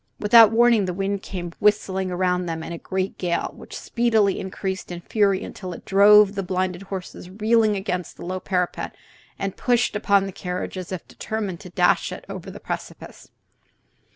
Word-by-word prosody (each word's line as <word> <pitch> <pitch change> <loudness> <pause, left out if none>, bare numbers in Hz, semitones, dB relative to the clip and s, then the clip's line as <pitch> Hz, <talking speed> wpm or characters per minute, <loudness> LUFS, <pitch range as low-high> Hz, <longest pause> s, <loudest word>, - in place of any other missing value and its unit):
Without 220 0 +7
warning 230 -2 +4
the 180 -1 -3
wind 195 +1 -2
came 175 -4 -6
whistling 190 -2 +1
around 180 0 0
them 165 -1 -4
in - - -7
a 170 - -6
great 190 0 -3
gale, 175 -2 -1
which - - -10
speedily 225 -5 +1
increased 190 -1 -5
in 175 0 -6
fury 200 0 +1
until 185 -2 -7
it - - -11
drove 205 +1 +6
the 200 - -2
blinded 185 -1 -2
horses 190 -2 -7
reeling 215 +2 +2
against 180 -2 -4
the - - -8
low 185 +1 -3
parapet 180 -2 -2 0.4
and 195 -1 -4
pushed 245 -2 +1
upon 200 -2 +3
the 195 - -5
carriage 180 +1 -5
as 185 -1 -6
if 185 -2 -6
determined 205 -6 -4
to 180 - -11
dash 180 +1 +2
it 180 - -8
over 195 -1 -7
the 195 - -9
precipice. - - -7
190 Hz, 180 wpm, -23 LUFS, 180-205 Hz, 0.4 s, Without